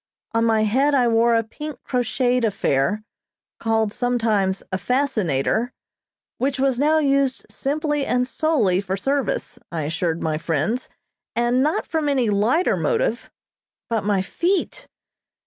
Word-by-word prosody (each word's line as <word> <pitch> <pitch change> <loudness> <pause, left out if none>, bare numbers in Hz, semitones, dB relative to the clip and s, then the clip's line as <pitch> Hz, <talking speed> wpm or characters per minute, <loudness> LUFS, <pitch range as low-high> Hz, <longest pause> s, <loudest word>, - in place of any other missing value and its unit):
On 230 0 +1
my 220 -1 +3
head 270 +7 +2
I 250 -3 +3
wore 230 0 +3
a 230 - +2
pink 300 +5 -8
crocheted 250 0 0
affair, 200 -2 +1 0.6
called 220 -2 0
sometimes 220 -6 0
a 185 - -1
"fascinator," 230 - 0 0.7
which 270 +1 0
was 265 -2 +1
now 305 +2 +3
used 275 -3 +1
simply 295 +1 -1
and 250 -2 +1
solely 250 - +1
for 195 -1 -3
service, 270 +3 -2
I 165 -2 -2
assured 165 +2 -2
my 155 -1 -1
friends, 165 - -1 0.5
and 240 +2 +2
not 300 +4 +1
from 315 -3 -1
any 255 -6 +1
lighter 225 - +2
motive, - - 0 0.6
but 225 -3 0
my 200 -2 +1
feet! 375 - -1
240 Hz, 135 wpm, -22 LUFS, 205-275 Hz, 0.7 s, my